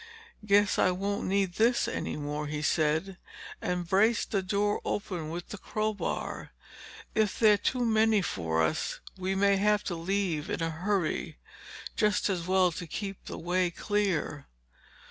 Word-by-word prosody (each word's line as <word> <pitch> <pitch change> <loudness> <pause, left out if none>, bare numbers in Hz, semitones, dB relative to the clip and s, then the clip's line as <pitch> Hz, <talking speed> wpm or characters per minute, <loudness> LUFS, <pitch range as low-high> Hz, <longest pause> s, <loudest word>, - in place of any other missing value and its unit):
"Guess 205 0 +3
I - - +5
won't 200 +3 -2
need 195 -1 +1
this 235 +2 +3
any - - -3
more," 150 0 -3
he 150 0 -3
said 160 +5 +1 0.4
and 180 -1 -2
braced 215 +6 +2
the 200 - +1
door 205 +2 0
open 175 -6 -3
with 170 +2 -6
the 205 - -7
crowbar. 215 0 -3 0.6
"If 215 -2 +1
they're 215 -2 +6
too 245 +4 0
many 220 -2 +3
for 80 - 0
us, 80 - -1 0.2
we 190 +1 -2
may 200 0 +4
have 210 +1 +2
to 175 - -3
leave 175 -2 -1
in 175 - -2
a 165 - -1
hurry. 180 +1 -1 0.6
Just 210 -1 +2
as 175 -2 -3
well 185 -1 +4
to 170 +1 -6
keep 195 +4 -5
the - - -6
way 180 +1 +1
clear." 180 -6 -1
190 Hz, 155 wpm, -29 LUFS, 170-205 Hz, 0.6 s, they're